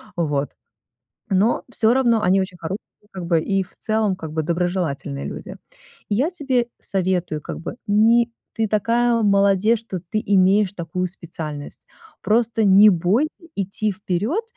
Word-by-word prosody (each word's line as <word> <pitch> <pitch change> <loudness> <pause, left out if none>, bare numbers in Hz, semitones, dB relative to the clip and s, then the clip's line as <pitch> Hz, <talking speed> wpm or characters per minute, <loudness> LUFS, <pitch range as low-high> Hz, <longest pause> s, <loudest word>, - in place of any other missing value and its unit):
Вот. 145 -4 -1 0.7
Но 200 +4 +2
всё 225 -1 +3
равно 240 -4 +3
они 190 0 +3
очень 185 -1 -5
хорошие, 175 +5 -4 0.3
как 185 -2 -6
бы, 170 -2 +2
и 195 +3 0
в 185 - -20
целом, 215 -3 0
как 160 -4 -8
бы, 160 0 -1
доброжелательные 165 -5 -2
люди. - - -7 0.5
И 205 - +1
я 280 - +1
тебе 265 -8 0
советую, 180 -5 -1
как - - -7
бы, 165 - -7
не 230 +3 +4 0.2
ты 225 -1 0
такая 230 +3 +2
молодец, 200 +2 +3
что 210 -5 -6
ты 185 +5 -3
имеешь 195 0 +3
такую 185 0 -3
специальность. 160 -5 -8 0.3
Просто 225 0 +1
не 200 +2 +8
бой 190 - +2 0.3
идти 200 +2 -1
вперед. 200 - -2
195 Hz, 150 wpm, -21 LUFS, 175-220 Hz, 0.7 s, не